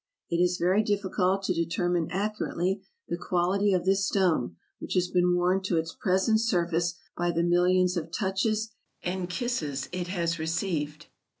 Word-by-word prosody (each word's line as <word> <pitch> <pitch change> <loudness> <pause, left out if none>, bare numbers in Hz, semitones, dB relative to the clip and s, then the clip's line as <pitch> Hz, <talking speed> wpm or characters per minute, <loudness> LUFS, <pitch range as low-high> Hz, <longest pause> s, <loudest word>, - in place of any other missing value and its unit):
It 170 - +2
is 180 0 +2
very 185 +4 +3
difficult 195 -2 0
to 190 - +1
determine 170 0 0
accurately 195 -1 -1 0.3
the 170 - -3
quality 185 +3 +1
of 180 -2 +1
this 195 +1 +3
stone, 180 - +1 0.2
which - - -5
has 180 -1 +2
been 180 0 +2
worn 180 +2 +2
to 180 -3 +1
its 165 0 -2
present 195 +3 +2
surface 175 -5 +1 0.2
by 175 0 0
the 170 0 +1
millions 180 +1 +3
of 165 -2 -3
touches 215 +3 0 0.3
and 180 0 -2
kisses 170 - -2
it 180 0 -3
has 170 -2 -1
received. 160 -2 -2
180 Hz, 160 wpm, -28 LUFS, 170-195 Hz, 0.3 s, very